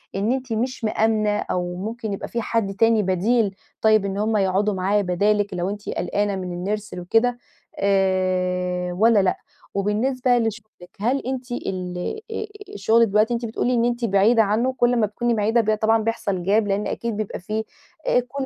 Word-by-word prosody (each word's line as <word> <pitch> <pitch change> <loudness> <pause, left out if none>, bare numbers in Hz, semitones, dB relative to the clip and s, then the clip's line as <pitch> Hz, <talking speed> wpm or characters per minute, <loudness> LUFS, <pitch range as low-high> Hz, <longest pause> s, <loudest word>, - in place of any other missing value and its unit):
إن 205 +5 0
أنتِ 260 -3 -2
مش 250 +3 -2
مآمنة 215 -1 +1
أو 180 0 -2
ممكن 220 +3 -4
يبقى 195 - -5
في 235 - -3
حد 220 -4 -1
تاني 225 0 +3
بديل 200 +3 +1 0.3
طيب 215 -2 +4
إن 195 0 -3
هُم 215 +1 +1
يقعُدوا 195 +2 +1
معاه 195 +2 +1
بدالِك 205 +2 +1
لو 180 +1 -1
أنتِ 205 +1 -6
قلقانة 205 -1 -1
من 185 +2 -3
الnursery 210 -2 -10
وكده 225 +7 +1 0.4
آآ، 185 -2 +1
والّا 220 +3 +4
لأ؟ 185 - +1 0.4
وبالنسبة 245 +5 +1
لشُغلِك 215 -5 -4
هل 250 +6 +1
أنتِ 255 -1 -4
ال 180 -6 -4 0.3
آآ 435 - -3 0.3
شُغلِك 225 +3 +4
دلوقتي 215 +3 +2
أنتِ 235 0 -2
بتقولي 235 +2 -1
إن 235 0 +2
أنتِ 240 0 0
بعيدة 215 +3 +4
عنّه 230 +6 +1
كل 245 -1 +2
ما 225 -3 +2
تكوني 240 +3 -1
بعيدة 225 +2 +2
ب 215 0 +1
طبعًا 225 +1 +3
بيحصَل 200 -5 -2
Gap - - -11 0.2
لإن 200 +1 0
أكيد 230 -3 -3
بيبقى 215 -2 -4
في 215 +4 -3 0.4
آآ، - - +4
كل 265 +3 -4
215 Hz, 175 wpm, -23 LUFS, 195-230 Hz, 0.4 s, طيب